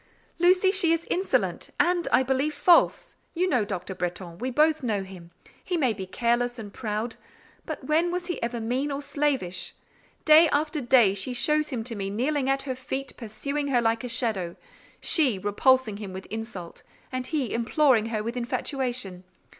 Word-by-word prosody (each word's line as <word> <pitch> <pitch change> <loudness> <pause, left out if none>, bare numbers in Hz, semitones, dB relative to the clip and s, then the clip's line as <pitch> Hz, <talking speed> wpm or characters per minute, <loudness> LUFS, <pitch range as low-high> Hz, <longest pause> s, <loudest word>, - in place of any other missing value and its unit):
"Lucy, 365 +2 +4
she 380 -4 +4
is 330 0 0
insolent; 375 +2 0
and, 350 -1 +2
I 255 - +5
believe, 270 +3 0
false. 355 +10 +3 0.2
You 360 +2 +1
know 250 - +2
Dr. 190 -2 -5
Bretton. 180 -1 -5
We 255 - -2
both 305 +4 +3
know 215 -6 -1
him. 185 -3 -12 0.3
He 360 - -2
may 260 -8 +2
be 190 -2 -7
careless 240 +4 0
and 205 -3 -8
proud; 220 +1 -3 0.5
but - - -5
when 325 +3 +1
was 355 0 -3
he 350 -1 -4
ever 235 0 -2
mean 250 +6 -1
or 280 +1 -4
slavish? 270 -13 -1 0.5
Day 315 +1 +7
after 300 +1 0
day 240 -5 +5
she 200 +6 -2
shows 300 +5 +1
him 245 -5 -3
to 235 +1 -4
me 195 -2 -4
kneeling 265 +6 0
at 270 0 +1
her 265 -2 -3
feet, 265 +1 -5
pursuing 280 +6 -4
her 260 -3 +2
like 225 -1 +1
her 250 - -5
shadow. 210 -8 -1 0.5
She—repulsing 235 - +2
him 200 -3 -7
with 190 0 -7
insult, 220 -6 -7 0.3
and 255 -1 -3
he 280 -6 -2
imploring 235 -1 +2
her 220 -2 -2
with 230 +2 -4
infatuation. 245 -5 -3
250 Hz, 175 wpm, -26 LUFS, 215-295 Hz, 0.5 s, Day